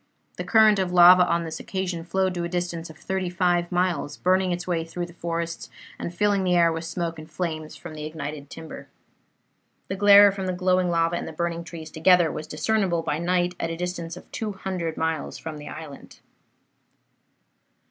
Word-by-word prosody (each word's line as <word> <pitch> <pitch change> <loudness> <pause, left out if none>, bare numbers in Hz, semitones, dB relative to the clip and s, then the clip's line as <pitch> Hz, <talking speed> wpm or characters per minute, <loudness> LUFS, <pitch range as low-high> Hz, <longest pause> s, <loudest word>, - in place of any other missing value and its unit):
The - - -3
current 215 -3 +5
of 185 -2 -1
lava 180 0 +8
on 170 0 +1
this 160 -1 -6
occasion 185 -3 -3
flowed 185 +2 0
to 175 -1 -3
a 170 - -3
distance 175 -2 -3
of 160 - -12
thirty 190 0 -3
five 175 -1 +1
miles, 175 -5 -1
burning 185 0 +2
its 175 0 -3
way 170 -2 -1
through 175 +2 -5
the 170 - -13
forests, 170 0 -4 0.3
and - - -4
filling 200 +2 +1
the 180 -1 +2
air 170 -1 +4
with 165 +1 -5
smoke 165 -1 -3
and 155 +1 -11
flames 155 -2 -4
from 170 -2 -10
the 155 -1 -7
ignited 150 -2 -6
timber. 160 -1 -9 1.0
The 190 - -2
glare 205 0 +8
from 190 -1 -5
the 185 - -1
glowing 185 0 +1
lava 165 0 +1
and - - -5
the - - -6
burning 170 +1 -3
trees 160 -2 -9
together 170 0 +4
was 155 0 -6
discernible 170 +1 0
by 150 0 -2
night 175 +1 +1
at 165 - -2
a 165 - -4
distance 175 -1 -4
of - - -14
200 190 -6 -4
miles 160 -2 -2
from 155 -2 -7
the 145 - -9
island. 155 -3 -10
175 Hz, 190 wpm, -25 LUFS, 165-185 Hz, 1.0 s, lava